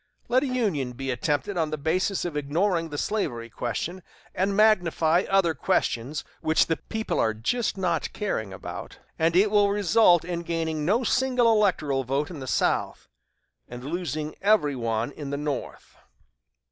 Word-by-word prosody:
Let 255 Hz, +2 st, +4 dB
a 285 Hz, -, -1 dB
union 195 Hz, -, -1 dB
be 135 Hz, +2 st, -4 dB
attempted 145 Hz, +8 st, -1 dB
on 160 Hz, -2 st, +1 dB
the 155 Hz, -, -3 dB
basis 180 Hz, +7 st, 0 dB
of 170 Hz, -4 st, -4 dB
ignoring 165 Hz, +4 st, 0 dB
the 145 Hz, -, -5 dB
slavery 120 Hz, -, -2 dB
question, 160 Hz, -, -4 dB, 0.3 s
and 195 Hz, +1 st, 0 dB
magnifying 175 Hz, -5 st, +3 dB
other 195 Hz, -4 st, +3 dB
questions 130 Hz, +1 st, -1 dB, 0.2 s
which 160 Hz, 0 st, +3 dB
the 165 Hz, -, -1 dB
people 220 Hz, 0 st, -3 dB
are 110 Hz, -1 st, +1 dB
just 200 Hz, -, -1 dB
now 185 Hz, -2 st, 0 dB
not 165 Hz, -2 st, -1 dB
caring 110 Hz, -, -3 dB
about, 95 Hz, -, -8 dB, 0.2 s
and 165 Hz, +1 st, +2 dB
it 200 Hz, +3 st, +4 dB
will 205 Hz, -1 st, +4 dB
result 200 Hz, -3 st, +4 dB
in 175 Hz, -1 st, -3 dB
gaining 165 Hz, -3 st, -2 dB
no 220 Hz, +9 st, +2 dB
single 250 Hz, -2 st, +2 dB
electoral 155 Hz, -11 st, +1 dB
vote 140 Hz, +5 st, -1 dB
in 160 Hz, -, -7 dB
the 130 Hz, -, -7 dB
South, -, -, 0 dB, 0.6 s
and 125 Hz, 0 st, -9 dB
losing 155 Hz, -1 st, -3 dB
every 195 Hz, -9 st, +3 dB
one 115 Hz, 0 st, -1 dB
in 145 Hz, -1 st, -7 dB
the 140 Hz, -, -2 dB
North." 145 Hz, -2 st, -5 dB
165 Hz, 165 wpm, -26 LUFS, 140-200 Hz, 0.6 s, Let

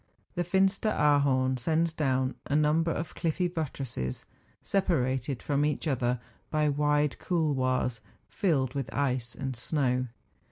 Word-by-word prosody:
Tlie 175 Hz, -, +1 dB
Fin¬ 190 Hz, +3 st, +4 dB
steraarhorn 145 Hz, -, +2 dB
sends 160 Hz, +5 st, +1 dB
down 130 Hz, -4 st, +1 dB
a 140 Hz, -, 0 dB
number 155 Hz, +2 st, +3 dB
of 160 Hz, +1 st, -4 dB
cliffy 170 Hz, +2 st, 0 dB
buttresses, 135 Hz, -, -4 dB, 0.4 s
separated 135 Hz, -, 0 dB
from 145 Hz, 0 st, +1 dB
each 150 Hz, +2 st, 0 dB
other 125 Hz, -3 st, 0 dB, 0.3 s
by 155 Hz, -1 st, +2 dB
wide 150 Hz, 0 st, +1 dB
couloirs 130 Hz, -8 st, 0 dB, 0.3 s
filled 140 Hz, -, 0 dB
with 135 Hz, -3 st, -3 dB
ice 125 Hz, -4 st, -1 dB
and 135 Hz, -1 st, -4 dB
snow. 125 Hz, 0 st, 0 dB
145 Hz, 125 wpm, -29 LUFS, 130-160 Hz, 0.4 s, Fin¬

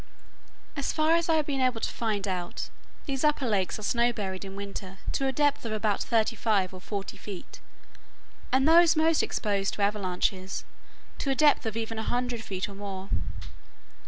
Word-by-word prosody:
As 280 Hz, -2 st, -1 dB
far 310 Hz, +1 st, +2 dB
as 335 Hz, 0 st, +2 dB
I 325 Hz, -, +5 dB
have 310 Hz, -2 st, +2 dB
been 275 Hz, -2 st, -1 dB
able 255 Hz, -3 st, +2 dB
to -, -, -1 dB
find 215 Hz, -3 st, -1 dB
out, 180 Hz, -2 st, -3 dB, 0.3 s
these 270 Hz, -1 st, -2 dB
upper 295 Hz, -3 st, +2 dB
lakes 195 Hz, -5 st, +1 dB
are 215 Hz, -, -8 dB
snow 235 Hz, +3 st, +3 dB
buried 190 Hz, -4 st, -4 dB
in 195 Hz, 0 st, -7 dB
winter 195 Hz, -1 st, -6 dB
to 270 Hz, -, 0 dB
a -, -, +2 dB
depth 290 Hz, +1 st, +2 dB
of 230 Hz, -, -4 dB
about 215 Hz, -1 st, 0 dB
thirty 225 Hz, -1 st, +2 dB
five 200 Hz, -4 st, +1 dB
or 185 Hz, -, -9 dB
forty 200 Hz, 0 st, -5 dB
feet, 200 Hz, -4 st, -8 dB, 0.9 s
and 265 Hz, +2 st, +4 dB
those 335 Hz, +1 st, +7 dB
most 320 Hz, 0 st, +4 dB
exposed 200 Hz, -2 st, 0 dB
to 205 Hz, -, 0 dB
avalanches, 190 Hz, -2 st, 0 dB, 0.5 s
to 275 Hz, -, -1 dB
a 270 Hz, -, +2 dB
depth 295 Hz, -5 st, +4 dB
of 220 Hz, 0 st, -3 dB
even 225 Hz, 0 st, -3 dB
a -, -, 0 dB
hundred 245 Hz, 0 st, -1 dB
feet 190 Hz, -3 st, -3 dB
or 200 Hz, -, -9 dB
more. 195 Hz, -1 st, -6 dB
220 Hz, 190 wpm, -28 LUFS, 195-270 Hz, 0.9 s, those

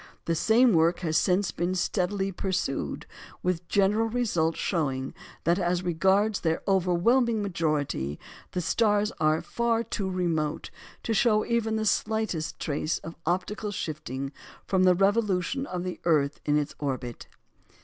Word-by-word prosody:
The 165 Hz, -, +1 dB
same 225 Hz, +7 st, +4 dB
work 170 Hz, +2 st, +3 dB
has 160 Hz, -3 st, -1 dB
since 180 Hz, +3 st, +2 dB
been 175 Hz, +2 st, -1 dB
steadily 195 Hz, +1 st, 0 dB
pursued, 185 Hz, -7 st, -2 dB, 0.4 s
with 180 Hz, -1 st, +1 dB
the 170 Hz, -, -22 dB
general 205 Hz, +3 st, +3 dB
result 205 Hz, -9 st, 0 dB
of -, -, -9 dB
showing 135 Hz, -7 st, -1 dB, 0.3 s
that, 170 Hz, +3 st, +2 dB
as 175 Hz, 0 st, 0 dB
regards 190 Hz, +5 st, +2 dB
their 160 Hz, -1 st, -1 dB
overwhelming 205 Hz, +5 st, +2 dB
majority, 150 Hz, -, -1 dB, 0.3 s
the 180 Hz, -, -1 dB
stars 210 Hz, +3 st, +2 dB
are 155 Hz, +1 st, +2 dB
far 235 Hz, -1 st, 0 dB
too 205 Hz, -3 st, -3 dB
remote 165 Hz, -5 st, -1 dB, 0.3 s
to 225 Hz, -, -1 dB
show 215 Hz, 0 st, +3 dB
even 230 Hz, -2 st, 0 dB
the 220 Hz, 0 st, -1 dB
slightest 215 Hz, -7 st, -1 dB
trace 155 Hz, +1 st, -1 dB
of 165 Hz, -, -9 dB
optical 195 Hz, +4 st, -1 dB
shifting 140 Hz, -7 st, -4 dB, 0.3 s
from 185 Hz, -1 st, +2 dB
the 180 Hz, -1 st, +6 dB
revolution 205 Hz, +5 st, +1 dB
of 180 Hz, -1 st, -4 dB
the 185 Hz, -1 st, -5 dB
earth 150 Hz, -4 st, +2 dB
in 150 Hz, 0 st, +3 dB
its 150 Hz, -1 st, -1 dB
orbit. 130 Hz, -4 st, -4 dB
180 Hz, 150 wpm, -27 LUFS, 160-210 Hz, 0.4 s, the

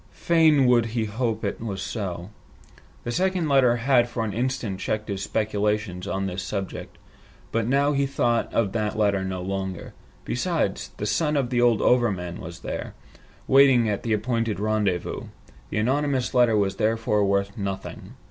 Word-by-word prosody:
Fain 160 Hz, -5 st, +3 dB
would 120 Hz, -2 st, +4 dB
he 110 Hz, -, +1 dB
hope 110 Hz, +1 st, -2 dB
it -, -, -3 dB
was 100 Hz, -4 st, -4 dB
so. 95 Hz, -3 st, -5 dB, 0.7 s
The 120 Hz, -, -3 dB
second 185 Hz, +2 st, 0 dB
letter 135 Hz, -4 st, +4 dB
had 120 Hz, 0 st, +3 dB
for 120 Hz, -1 st, -3 dB
an 105 Hz, -, -4 dB
instant 120 Hz, -4 st, -2 dB
checked 110 Hz, 0 st, -3 dB
his 100 Hz, -1 st, -3 dB
speculations 105 Hz, -3 st, -1 dB
on 95 Hz, -1 st, -2 dB
this 95 Hz, 0 st, -3 dB
subject, 100 Hz, -1 st, -5 dB, 0.5 s
but 115 Hz, 0 st, 0 dB
now 140 Hz, +3 st, +3 dB
he 140 Hz, -1 st, +1 dB
thought 120 Hz, -3 st, 0 dB
of 105 Hz, -4 st, +1 dB
that 110 Hz, -1 st, -2 dB
letter 100 Hz, -3 st, +2 dB
no 95 Hz, -1 st, -4 dB
longer. 95 Hz, -1 st, -4 dB, 0.3 s
Besides, -, -, -1 dB
the 105 Hz, -, -3 dB
son 150 Hz, +6 st, +1 dB
of 130 Hz, -3 st, -1 dB
the 120 Hz, -1 st, +2 dB
old 120 Hz, -3 st, +3 dB
overman 95 Hz, -9 st, +1 dB
was 85 Hz, +1 st, -9 dB
there, -, -, -5 dB, 0.5 s
waiting 135 Hz, -4 st, +6 dB
at 105 Hz, -2 st, -1 dB
the 115 Hz, -, -1 dB
appointed 115 Hz, -1 st, -1 dB
rendezvous. 105 Hz, -4 st, -1 dB, 0.4 s
The -, -, -3 dB
anonymous 130 Hz, +3 st, 0 dB
letter 120 Hz, -4 st, +4 dB
was 100 Hz, -2 st, 0 dB
therefore 110 Hz, -1 st, +1 dB
worth 100 Hz, 0 st, 0 dB
nothing. 95 Hz, -2 st, -6 dB
110 Hz, 165 wpm, -25 LUFS, 100-125 Hz, 0.7 s, waiting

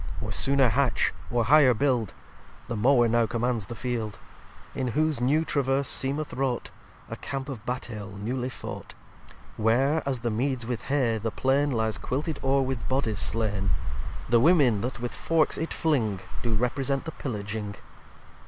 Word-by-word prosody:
liii -, -, -5 dB
Or -, -, -2 dB
sooner 135 Hz, -2 st, +4 dB
hatch 130 Hz, +3 st, +1 dB, 0.2 s
or 120 Hz, -2 st, +1 dB
higher 135 Hz, -1 st, +6 dB
build: 125 Hz, -5 st, 0 dB, 0.5 s
The 120 Hz, -, -3 dB
Mower 120 Hz, +2 st, +4 dB
now 115 Hz, 0 st, +2 dB
commands 115 Hz, -1 st, -1 dB
the 120 Hz, -, -6 dB
Field; 115 Hz, -3 st, -3 dB, 0.6 s
In 130 Hz, -, -2 dB
whose 155 Hz, -5 st, +2 dB
new 150 Hz, +6 st, +2 dB
Traverse 135 Hz, -2 st, +1 dB
seemeth 145 Hz, +3 st, 0 dB
wrought 130 Hz, -2 st, -2 dB, 0.4 s
A -, -, -6 dB
Camp 135 Hz, 0 st, -5 dB
of 130 Hz, -7 st, -7 dB
Battail 105 Hz, -6 st, -5 dB
newly 125 Hz, +5 st, -3 dB
fought: -, -, -8 dB, 0.6 s
Where, 130 Hz, +8 st, +2 dB
as 130 Hz, -3 st, -2 dB
the 120 Hz, -1 st, -1 dB
Meads 125 Hz, +2 st, -1 dB
with 120 Hz, -1 st, -4 dB
Hay, 125 Hz, -5 st, +1 dB
the 115 Hz, +2 st, -2 dB
Plain 135 Hz, +5 st, +1 dB
Lyes 110 Hz, -4 st, 0 dB
quilted 150 Hz, +3 st, -3 dB
ore 135 Hz, 0 st, +2 dB
with 130 Hz, -3 st, -3 dB
Bodies 125 Hz, -6 st, 0 dB
slain: 105 Hz, -4 st, +1 dB, 0.6 s
The 120 Hz, +1 st, +4 dB
Women 135 Hz, -, +4 dB
that 125 Hz, +1 st, -3 dB
with 120 Hz, 0 st, -4 dB
forks 165 Hz, -2 st, +1 dB
it 160 Hz, -, -3 dB
filing, 120 Hz, -, 0 dB, 0.2 s
Do 115 Hz, -2 st, 0 dB
represent 135 Hz, +5 st, -1 dB
the 160 Hz, -, -4 dB
Pillaging. 105 Hz, -6 st, -5 dB
125 Hz, 160 wpm, -27 LUFS, 115-140 Hz, 0.6 s, higher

